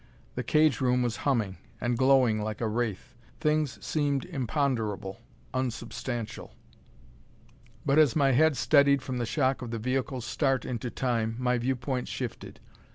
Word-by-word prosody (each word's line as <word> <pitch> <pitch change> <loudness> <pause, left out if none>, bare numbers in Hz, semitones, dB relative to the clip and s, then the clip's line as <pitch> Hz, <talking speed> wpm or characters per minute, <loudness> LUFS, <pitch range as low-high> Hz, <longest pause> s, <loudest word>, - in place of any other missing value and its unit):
The - - -3
cage 155 -4 +3
room 125 -1 +2
was 120 -3 -1
humming, 110 -8 0 0.2
and 120 0 0
glowing 130 -4 +4
like 105 0 -4
a 115 - 0
wraith; 110 -3 -3 0.3
things 150 -4 +1
seemed 145 -3 0
imponderable, 115 -7 -2 0.3
unsubstantial. 120 -2 -4 1.3
But 140 +3 +4
as 150 -6 +5
my 140 -3 +4
head 150 +2 +4
steadied 140 -2 +4
from 130 -2 -3
the 120 - -1
shock 130 0 +1
of 125 - -5
the 115 - -3
vehicle's 130 +1 -2
start 135 -3 0
into 120 0 -3
Time, 115 -3 -1
my 125 -1 +1
viewpoint 125 +1 -2
shifted. - - -6
125 Hz, 145 wpm, -28 LUFS, 115-135 Hz, 1.3 s, as